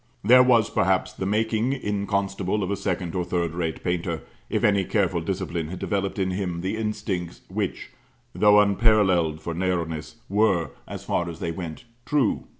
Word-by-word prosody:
There 125 +5 +8
was, 120 -4 +5
perhaps, 95 0 +1
the 95 - -3
making, 110 +4 +1
in 105 -6 -2
Constable, 100 0 -1
of 95 - -2
a - - +1
second 90 -3 -2
or 90 - 0
third 85 -2 -1
rate 85 -2 -3
painter, 85 -2 -2 0.3
if - - -1
any 100 -2 +4
careful 90 -3 0
discipline 85 -2 -3
had 90 +3 -6
developed 100 +1 -2
in 95 -1 0
him 90 -3 -2
the 95 +4 -2
instincts 105 -5 -3
which, - - -3 0.4
though 105 0 +6
unparalleled 100 -6 +3
for 85 - -4
narrowness, 85 -2 -2
were, 100 -4 +2 0.2
as - - -7
far 85 0 0
as 85 -1 -8
they 85 -2 -2
went, 85 +4 -7 0.2
true. 145 -5 +1
95 Hz, 170 wpm, -25 LUFS, 85-105 Hz, 0.4 s, There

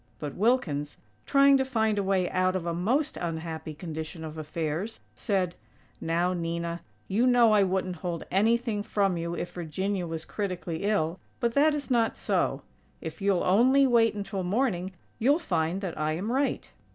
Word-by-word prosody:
But 145 +4 -5
Wilkins, 175 - 0 0.3
trying 275 0 +6
to 265 - +2
find 220 -5 +1
a - - 0
way 190 -2 +1
out 185 0 +1
of 180 -2 -2
a 170 - -1
most 250 - 0
unhappy 160 -2 -4
condition 160 0 -6
of 155 -1 -6
affairs, 160 +6 -3
said: 185 -4 -1 0.5
"Now, 170 +2 +1
Nina, 170 0 -3 0.3
you 230 +6 +2
know 240 -3 +5
I 210 -1 +5
wouldn't 185 -1 0
hold 170 0 -4
anything 225 +2 +2
from 200 -2 +1
you 170 0 -3
if 175 - -4
Virginia 180 +3 -2
was 160 -1 -5
critically 180 -3 -4
ill, 185 -4 0 0.2
but 235 -3 0
that 295 +3 +4
is 285 -2 -5
not 230 -2 +2
so. - - 0 0.4
If 160 +1 -7
you'll 195 -2 +2
only 255 +9 +5
wait 230 -3 +4
until 200 -1 -3
morning 190 -2 0 0.3
you'll 275 +6 +4
find 175 - -1
that 185 -4 -4
I 155 0 0
am 195 +8 -3
right." 275 +2 -1
185 Hz, 170 wpm, -28 LUFS, 170-225 Hz, 0.5 s, trying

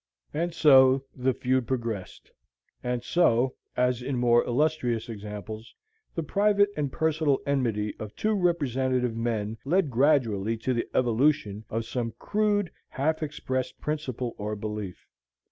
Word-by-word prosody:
And 170 +3 -1
so 135 -4 +6
the 130 0 +1
feud 130 -2 0
progressed; 115 -7 -4 0.5
and 125 -1 -2
so, 130 -6 +3 0.2
as 125 -1 +2
in 130 +1 -2
more 120 -1 +4
illustrious 125 -4 0
examples, 105 0 -7 0.4
the 165 - -1
private 205 +5 +3
and 145 -3 -1
personal 155 -2 +1
enmity 115 -7 0
of 105 -1 -7
two 215 0 0
representative 130 - +1
men 115 -2 -2
led 160 +1 +1
gradually 115 -5 +2
to 125 +3 -1
the 120 - -1
evolution 120 -4 +2
of 115 +1 -2
some 120 -1 -3
crude, 205 -3 0 0.2
half 155 +4 -1
expressed 130 -4 -3
principle 130 -6 -3
or 105 +1 -3
belief. 105 -3 -6
130 Hz, 130 wpm, -27 LUFS, 115-150 Hz, 0.5 s, so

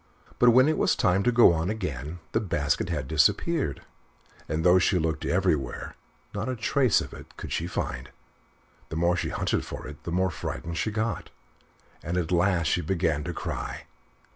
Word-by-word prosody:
But 125 - +7
when 130 +3 +6
it 155 - +1
was - - +3
time 95 +1 +2
to 125 - +2
go 120 -7 +7
on 80 +2 -1
again 85 - -4
the - - +2
basket 85 -8 -1
had 65 - -2
disappeared 80 - +1 0.7
and, 80 +3 -1
though 90 +1 +7
she 90 +1 +2
looked 80 -2 -1
everywhere, 85 -9 0 0.4
not 105 +4 -3
a 130 - -1
trace 125 +1 +2
of - - -8
it - - -12
could - - -7
she 85 - -1
find. 65 -7 -4 0.8
The - - -5
more 85 +2 +2
she - - -2
hunted - - -1
for - - -7
it, 75 - -10
the 85 - -5
more 95 +1 +1
frightened 85 +1 -5
she - - 0
got, 110 -1 -2 0.7
and 85 +3 -3
at 90 -1 -1
last 90 -1 +2
she 90 - +1
began 80 -3 0
to 90 - -3
cry. - - -4
90 Hz, 185 wpm, -27 LUFS, 80-100 Hz, 0.8 s, But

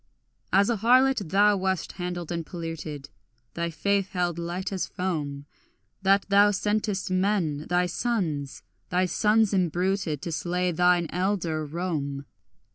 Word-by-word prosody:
As 200 +4 +4
a 230 - 0
harlot 245 -2 +3
thou 205 +3 +4
wast 190 -1 -1
handled 175 -2 -5
and 170 -1 -2
polluted, 160 -4 -6 0.4
Thy 170 0 -2
faith 200 +4 0
held 175 -2 -1
light 175 +3 -3
as 190 - -2
foam, 150 -6 -3 0.6
That 195 +1 +3
thou 200 +1 +5
sentest 205 -1 -1
men 185 -6 0
thy 180 0 +2
sons, 170 - -2 0.3
thy 180 +1 +2
sons 210 +3 +2
imbruted, 180 -3 0
To 170 - -3
slay 180 +2 -1
thine 180 +1 +3
elder 180 -4 -1
Rome. 145 -4 -3
180 Hz, 130 wpm, -26 LUFS, 165-200 Hz, 0.6 s, thou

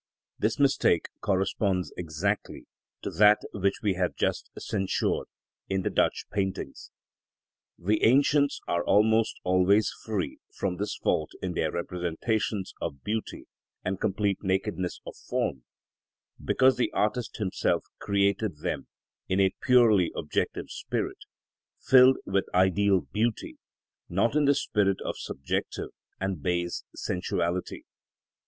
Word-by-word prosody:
This 110 +2 +1
mistake 135 - +3
corresponds 95 -1 0
exactly 90 +5 -3 0.4
to - - -3
that 105 +4 +6 0.2
which 100 0 0
we 100 -2 +2
have 90 -1 -1
just - - -1
censured 95 -2 -1 0.4
in 95 -1 0
the - - -1
Dutch - - +1
paintings. 95 -2 -3 0.9
The 105 +5 0
ancients 140 +3 +4
are 85 0 0
almost 110 +2 +3
always 95 +3 +3
free 105 -5 -3 0.2
from 90 -2 -1
this 105 +2 -2
fault 75 - 0
in 90 -1 -2
their 80 -2 0
representations 90 +4 -2
of 70 - -5
beauty 110 +1 -3 0.4
and 95 0 -2
complete 100 -1 0
nakedness 95 -1 -1
of - - -8
form, 65 -2 -1 0.8
because 130 0 +4
the 125 - +1
artist 110 +2 -1
himself 100 -4 0
created 100 -2 +1
them - - -3 0.4
in 95 - +1
a 95 -1 +3
purely 115 -9 +5
objective 75 - -2
spirit, - - -3 0.6
filled 130 0 +6
with 95 0 0
ideal 95 +1 +4
beauty, 105 - -2 0.5
not 105 +9 +1
in 150 -1 +3
the 140 0 +4
spirit 100 -6 +1
of - - -2
subjective, 70 - -3 0.3
and 95 -4 -2
base 85 +1 -1
sensuality. 90 0 -2
100 Hz, 120 wpm, -28 LUFS, 90-110 Hz, 0.9 s, that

